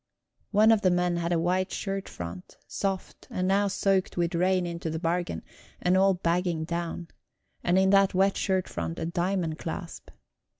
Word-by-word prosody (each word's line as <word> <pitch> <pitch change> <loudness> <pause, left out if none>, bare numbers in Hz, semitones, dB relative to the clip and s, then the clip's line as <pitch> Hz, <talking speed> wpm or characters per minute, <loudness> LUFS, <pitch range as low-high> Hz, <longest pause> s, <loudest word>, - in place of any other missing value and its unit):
One 215 +2 +5
of 220 -2 +4
the 185 - +4
men 180 -1 +1
had 170 0 -1
a 175 - +3
white 185 +3 0
shirt 195 -1 -3
front, 90 +1 -8
soft, 195 -2 -4
and 185 0 -1
now 200 +1 +3
soaked 195 -1 0
with 170 +1 0
rain 180 +1 +2
into 170 -1 -4
the 160 - -3
bargain, 165 - -2 0.4
and 180 +1 +2
all 190 0 +4
bagging 175 -1 0
down; 170 0 -4 0.5
and 175 +1 +2
in 190 0 +4
that 195 -1 +4
wet 195 +1 +3
shirt 190 -2 0
front 80 -1 -4
a - - -3
diamond 175 -1 -1
clasp. 170 +1 -6
180 Hz, 175 wpm, -27 LUFS, 170-190 Hz, 0.5 s, One